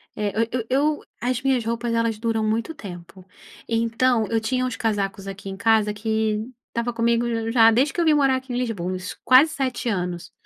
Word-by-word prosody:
É 210 Hz, -1 st, -1 dB
eu 230 Hz, -, +1 dB
eu 250 Hz, -1 st, -1 dB
eu 295 Hz, +4 st, +1 dB, 0.2 s
as 250 Hz, 0 st, -1 dB
minhas 265 Hz, -3 st, +1 dB
roupas 230 Hz, +1 st, -2 dB
elas 230 Hz, -1 st, 0 dB
duram 225 Hz, 0 st, -1 dB
muito 225 Hz, +8 st, -1 dB
tempo, 185 Hz, -, -11 dB, 0.4 s
então 230 Hz, +1 st, +1 dB
eu 230 Hz, -, +1 dB
tinha 255 Hz, +3 st, 0 dB
uns 250 Hz, -3 st, -3 dB
casacos 200 Hz, -2 st, -2 dB
aqui 195 Hz, 0 st, -7 dB
em 195 Hz, -, -6 dB
casa 220 Hz, 0 st, +3 dB
que 220 Hz, +1 st, -1 dB, 0.2 s
estava 235 Hz, +1 st, -2 dB
comigo 230 Hz, -1 st, 0 dB
já 230 Hz, -1 st, +6 dB
desde 265 Hz, +5 st, +2 dB
que 345 Hz, -, 0 dB
eu -, -, +2 dB
vim 315 Hz, -, +5 dB
morar 275 Hz, -2 st, +3 dB
aqui 260 Hz, 0 st, -8 dB
em 245 Hz, -, -2 dB
Lisboa, 200 Hz, -7 st, -2 dB
isso 185 Hz, -, -7 dB
quase 265 Hz, +5 st, +6 dB
7 260 Hz, -4 st, -2 dB
anos. 180 Hz, -5 st, -3 dB
230 Hz, 200 wpm, -23 LUFS, 215-250 Hz, 0.4 s, já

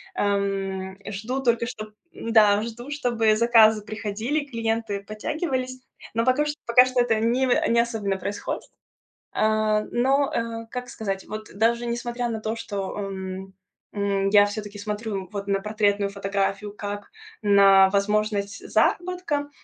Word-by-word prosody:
Эм, 195 Hz, -1 st, -1 dB
жду 225 Hz, +7 st, -3 dB
только 235 Hz, -1 st, +2 dB
что 215 Hz, -3 st, -7 dB, 0.2 s
м-да, 215 Hz, -, +4 dB
жду, 240 Hz, +4 st, -7 dB
чтобы 235 Hz, -6 st, +2 dB
заказы 220 Hz, -2 st, +5 dB
приходили, 220 Hz, +7 st, -3 dB
клиенты 225 Hz, -5 st, -2 dB
подтягивались, 255 Hz, -, -3 dB, 0.3 s
но 230 Hz, +1 st, +1 dB
пока 260 Hz, +4 st, +3 dB
что 295 Hz, 0 st, -2 dB
пока 250 Hz, +2 st, +7 dB
что 255 Hz, -1 st, +1 dB
это 225 Hz, -2 st, +2 dB
не 240 Hz, +4 st, +2 dB
вы 245 Hz, -, +3 dB
не 235 Hz, 0 st, +3 dB
особенно 215 Hz, -5 st, -2 dB
происходит. 200 Hz, +2 st, -4 dB, 0.7 s
Э, 215 Hz, 0 st, +2 dB
но, 270 Hz, +3 st, +2 dB
э, 230 Hz, 0 st, -3 dB
как 250 Hz, 0 st, -5 dB
сказать, 195 Hz, -4 st, -4 dB
вот 215 Hz, 0 st, -7 dB
даже 235 Hz, +3 st, +1 dB
несмотря 240 Hz, 0 st, -2 dB
на 220 Hz, -1 st, -3 dB
то, 220 Hz, +1 st, -2 dB
что, 200 Hz, -4 st, -5 dB
эм, 190 Hz, -1 st, -5 dB, 0.4 s
м, 200 Hz, -1 st, 0 dB
я 205 Hz, 0 st, +7 dB
всё-таки 205 Hz, 0 st, -6 dB
смотрю, 210 Hz, -2 st, -4 dB
вот, 200 Hz, -1 st, -4 dB
на 195 Hz, -1 st, +1 dB
портретную 205 Hz, -1 st, +1 dB
фотографию 200 Hz, +1 st, -2 dB
как 205 Hz, 0 st, -6 dB, 0.3 s
на 195 Hz, -2 st, +6 dB
возможность 205 Hz, 0 st, 0 dB
заработка. 350 Hz, -5 st, 0 dB
215 Hz, 140 wpm, -24 LUFS, 200-235 Hz, 0.7 s, пока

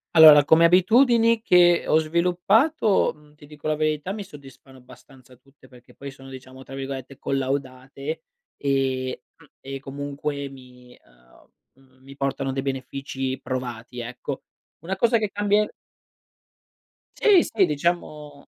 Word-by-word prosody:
Allora, 155 Hz, -2 st, +9 dB
come 160 Hz, +3 st, +5 dB
abitudini 230 Hz, +6 st, +4 dB
che 175 Hz, -2 st, +4 dB
ho 155 Hz, -, +4 dB
sviluppato, 180 Hz, -, +2 dB
mhmm, 150 Hz, 0 st, -22 dB
ti 150 Hz, -, -16 dB
dico 150 Hz, 0 st, -9 dB
la 155 Hz, -, +1 dB
verità 155 Hz, +3 st, -1 dB
mi 205 Hz, 0 st, -5 dB
soddisfano 135 Hz, -6 st, -15 dB
abbastanza 130 Hz, 0 st, -18 dB
tutte, 135 Hz, +1 st, -23 dB
perché 125 Hz, -1 st, -19 dB
poi 140 Hz, -, -9 dB
sono 135 Hz, 0 st, -13 dB
diciamo 130 Hz, 0 st, -12 dB
tra 135 Hz, -, -13 dB
virgolette 135 Hz, 0 st, -7 dB
"collaudate" 135 Hz, +2 st, -4 dB, 0.3 s
e 130 Hz, -2 st, -1 dB
mhmm, -, -, -20 dB
e 135 Hz, 0 st, -7 dB
comunque 140 Hz, +1 st, -5 dB
mi, 125 Hz, -2 st, -16 dB
uhm, 60 Hz, -, -27 dB
mhmm, 130 Hz, 0 st, -28 dB
mi 135 Hz, +1 st, -13 dB
portano 135 Hz, -1 st, -2 dB
dei 135 Hz, 0 st, -3 dB
benefici 135 Hz, 0 st, -4 dB
provati 125 Hz, -2 st, -6 dB
ecco. 120 Hz, +1 st, -6 dB, 0.4 s
Una 185 Hz, +4 st, -4 dB
cosa 230 Hz, +4 st, +2 dB
che 215 Hz, -2 st, -2 dB
cambie 205 Hz, +1 st, 0 dB, 1.5 s
Sì, 395 Hz, -5 st, +5 dB
sì 205 Hz, -4 st, +1 dB
diciamo 150 Hz, -2 st, -3 dB
140 Hz, 135 wpm, -23 LUFS, 130-170 Hz, 1.5 s, Allora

